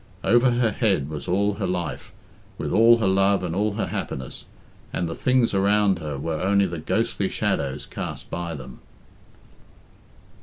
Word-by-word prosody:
Over 120 +2 +4
her 120 -2 +2
head 95 - +1
was 75 - -6
all 100 +3 +1
her 100 -1 -3
life, 90 -4 -4 0.5
with - - -3
all 115 +2 +7
her 110 -4 0
love 95 0 +3
and 85 -2 -2
all 105 +3 0
her 110 - -1
happiness, 65 -1 -5 0.5
and 85 - -2
the 80 - -4
things 125 +1 +2
around 100 -1 +3
her 75 -3 -4
were 80 +2 -3
only 100 +1 +3
the 85 -3 -4
ghostly - - -1
shadows 70 0 -2
cast - - -6
by 85 -2 -4
them. 65 -3 -10
95 Hz, 160 wpm, -24 LUFS, 80-105 Hz, 0.5 s, all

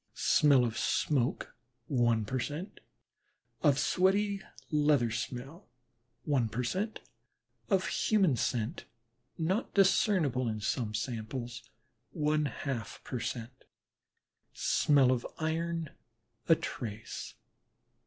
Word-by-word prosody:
smell 145 -8 +4
of 115 -1 -3
smoke, 135 -5 0 0.3
one 120 -5 +2
per 130 +4 -2
cent.; 150 - -5 0.8
of 145 -4 +4
sweaty 200 +4 +2 0.3
leather 145 -6 +3
smell, 130 - -5 0.5
one 130 -6 +1
per 120 +4 -2
cent.; 195 - -2 0.7
of 190 -3 +2
human 200 -7 +2
body 125 - 0
scent 120 +6 -1 0.5
(not 185 +8 -1
discernible 180 - +3
in 110 -1 -3
some 110 0 -1
samples), 120 +1 -4 0.5
one 150 0 +1
half 130 -6 -4
per 125 - -4
cent.; 120 +2 -5 0.9
smell 140 -4 +3
of 125 -2 0
iron, 165 0 -2 0.6
a 165 - +8
trace. 110 -7 -6
140 Hz, 105 wpm, -31 LUFS, 120-165 Hz, 0.9 s, a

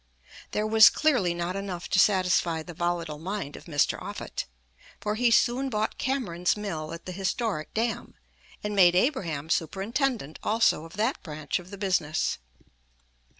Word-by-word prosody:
There 210 - -1
was 220 -1 +8
clearly 245 - +1
not 175 +2 -3
enough 195 -3 -4
to 190 - +3
satisfy 180 -4 +3
the 175 - -9
volatile 170 -2 -2
mind 185 -3 -4
of - - -11
Mr. 145 -4 +1
Offutt, - - -5 0.5
for 210 - -2
he 240 +2 +2
soon 250 +4 +3
bought 215 -2 -2
Cameron's 210 -10 0
mill 160 -7 -4
at 165 - -8
the 185 - -5
historic 190 -2 -2
dam, 230 +1 -2 0.5
and 210 0 -2
made 180 -3 +6
Abraham 180 - 0
superintendent 195 - -1
also 215 -7 +2
of 165 - -12
that 225 +6 -1
branch 155 -2 -3
of 180 0 -13
the 200 - -8
business. 185 -6 0
190 Hz, 150 wpm, -27 LUFS, 170-215 Hz, 0.5 s, was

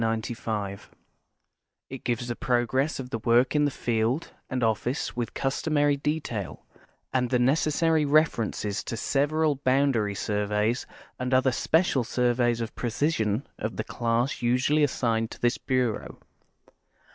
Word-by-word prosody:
It 135 - -7
gives 120 0 -1
the 120 - -3
progress 130 +5 0
of 130 -1 -6
the 115 - -2
work 120 +5 +3
in 150 0 +4
the - - +2
field 120 +3 -1 0.2
and 130 -1 -1
office 115 +4 -1
with 120 -1 -1
the - - -9
customary 145 +1 +1
detail, 140 - -3 0.5
and 125 -1 +1
the 125 - +2
necessary 155 +5 +2
references 130 -8 +1
to 115 - -4
several 145 +3 +1
boundary 130 -6 +1
surveys 105 +3 -1 0.3
and 125 +1 +1
other 130 0 +3
special 145 +1 +2
surveys 120 0 +1
of 115 - -4
precision 120 -2 0
of 110 +2 -3
the - - -1
class 120 +2 -1
usually 125 +5 +2
assigned 115 -5 0
to - - -10
this 120 0 +1
bureau. 125 -4 -1
125 Hz, 135 wpm, -27 LUFS, 115-140 Hz, 0.5 s, in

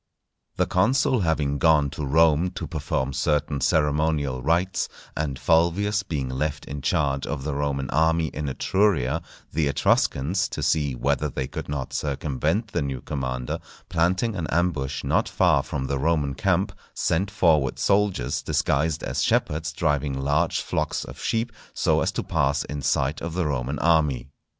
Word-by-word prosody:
_ - - -40
The - - +3
consul 125 +6 +2
having 75 -5 0
gone 75 -2 +4
to 75 - -5
Rome 80 +4 +3
to - - -4
perform 70 -4 -2
certain 75 0 0
ceremonial 75 -3 +1
rites, 85 +6 +1 0.3
and 75 -4 -2
Fulvius 95 +6 +2
being 75 -9 -3
left 70 +4 -2
in 70 +1 -6
charge 70 -1 0
of 70 -2 -3
the 75 0 -2
Roman 70 -1 -1
army 80 0 +2
in 75 -1 -4
Etruria, 95 -2 +1 0.3
the 75 -1 +1
Etruscans, 70 +4 +1
to - - -4
see 70 -4 +1
whether 75 +4 0
they 65 -1 -3
could - - -6
not 70 -2 -4
circumvent 75 - -1
the - - 0
new 70 -3 -3
commander, 65 -4 -3 0.3
planting 90 +6 +1
an 85 -5 -3
ambush 75 -5 -1
not - - +1
far - - +3
from 65 -2 -4
the 70 0 -1
Roman 75 -2 +1
camp, 90 +7 +1 0.2
sent 95 +5 0
forward 80 -9 +2
soldiers 100 -11 +1
disguised 80 +2 0
as - - -2
shepherds 80 +1 +1
driving 75 -3 0
large 70 +2 +1
flocks - - -2
of - - -10
sheep 115 +1 -1 0.2
so - - +2
as - - +1
to - - -2
pass 70 +2 +1
in 75 0 -5
sight - - 0
of 85 0 -4
the 90 -2 0
Roman 70 -1 -2
army. 75 -6 +2
75 Hz, 160 wpm, -25 LUFS, 70-85 Hz, 0.3 s, gone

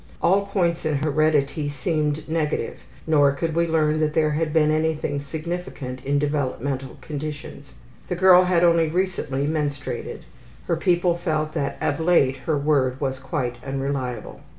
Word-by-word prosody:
All 200 +3 +2
points 175 -4 0
in 155 -1 0
heredity 150 0 +1
seemed 150 0 -1
negative, 160 -1 -2 0.3
nor 145 -3 +4
could 160 +3 -2
we 170 +1 +1
learn 155 -1 +2
that 155 -1 0
there 155 -1 +3
had 155 +1 -1
been 155 -1 +3
anything 155 -2 0
significant 145 -3 -5
in 140 +1 +1
developmental 140 -2 -2
conditions. 145 -2 -7 0.3
The 180 - -2
girl 185 0 +6
had 180 -1 +2
only 170 -1 +4
recently 155 -5 -1
menstruated. 145 -2 -3 0.4
Her 170 - +1
people 175 0 +2
felt 155 -3 -2
that 140 0 -2
of 145 - -1
late 160 -6 +3
her 155 -2 +2
word 140 -3 +1
was 135 -2 -2
quite 130 -2 -3
unreliable. 135 -2 -4
155 Hz, 150 wpm, -23 LUFS, 140-165 Hz, 0.4 s, girl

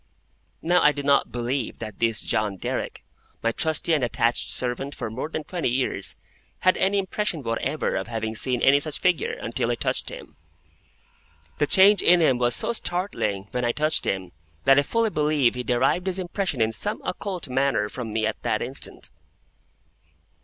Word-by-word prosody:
Now 175 +2 +3
I 150 - +5
do 145 - -5
not 140 0 +3
believe 120 +1 -3
that 110 -3 -8
this 115 -1 +1
John 105 -3 -1
Derrick, - - -4 0.4
my 115 - +2
trusty 160 +5 0
and 150 -4 +2
attached 120 0 0
servant 130 +3 -2
for 110 - -5
more 130 +7 -4
than 155 -1 -4
twenty 170 -2 -2
years, 125 +1 -1 0.5
had 185 - +4
any 195 +1 +1
impression 190 -4 -1
whatever 130 +6 -1
of 95 +2 -3
having 110 -1 -3
seen 125 +2 +1
any 140 +1 +6
such 150 0 -2
figure, 180 -3 +1
until 115 0 -3
I 120 - +1
touched - - 0
him. - - -11 1.2
The 145 - +2
change 195 +3 +7
in 180 0 +5
him 130 -7 +3
was 120 -1 +2
so - - 0
startling, 175 - -2
when 125 - -2
I 120 0 +1
touched 155 +1 +1
him, 95 -2 -2 0.3
that 135 +1 +6
I - - +5
fully 225 +9 0
believe 150 -6 +2
he 125 - -4
derived 130 +9 +1
his 190 0 0
impression 180 - -2
in 110 0 +2
some 205 - -1
occult 185 -4 -4
manner 135 -4 +1
from 115 0 -6
me 110 0 0
at 110 - -3
that - - -1
instant. - - -6
135 Hz, 180 wpm, -24 LUFS, 115-170 Hz, 1.2 s, change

